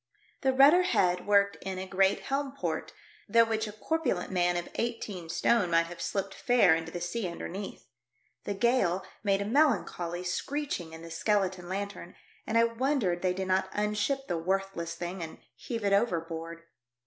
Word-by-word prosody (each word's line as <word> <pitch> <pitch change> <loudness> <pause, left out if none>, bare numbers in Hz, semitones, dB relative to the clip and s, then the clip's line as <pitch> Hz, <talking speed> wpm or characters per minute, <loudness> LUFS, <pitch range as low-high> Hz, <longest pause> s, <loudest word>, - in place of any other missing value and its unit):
The 265 - +3
rudder 280 +7 +7
head 180 - +1
worked 200 -1 +4
in 190 -1 -4
a 185 - -4
great 190 +1 +2
helm 275 0 -2
port, 160 -3 -3 0.4
through 230 0 +6
which 220 -1 -1
a - - -5
corpulent 215 - -1
man 175 -1 +2
of 175 - -3
eighteen 210 -7 -4
stone 190 +3 +2
might 165 0 +3
have 170 0 -9
slipped 195 -1 -2
fair 240 -9 +4
into 165 0 -2
the 175 - -4
sea 180 +4 -2
underneath. 185 +3 -6 0.6
The 205 - -2
gale 195 -5 +2 0.2
made 200 -1 +2
a - - -6
melancholy 200 - +1
screeching 180 - -3
in 160 0 -9
the 165 - -9
skeleton 185 0 0
lanthorn, 200 +1 -5 0.3
and 225 - +1
I 230 - +6
wondered 230 -6 0
they 180 -1 +1
did 190 0 -3
not 190 0 +2
unship 210 +6 0
the 170 - -1
worthless 185 -1 -2
thinsf 175 +2 -5
and 160 -1 -6 0.2
heave 230 -3 -5
it 200 - +3
overboard. 165 -5 -1
195 Hz, 170 wpm, -29 LUFS, 175-230 Hz, 0.6 s, rudder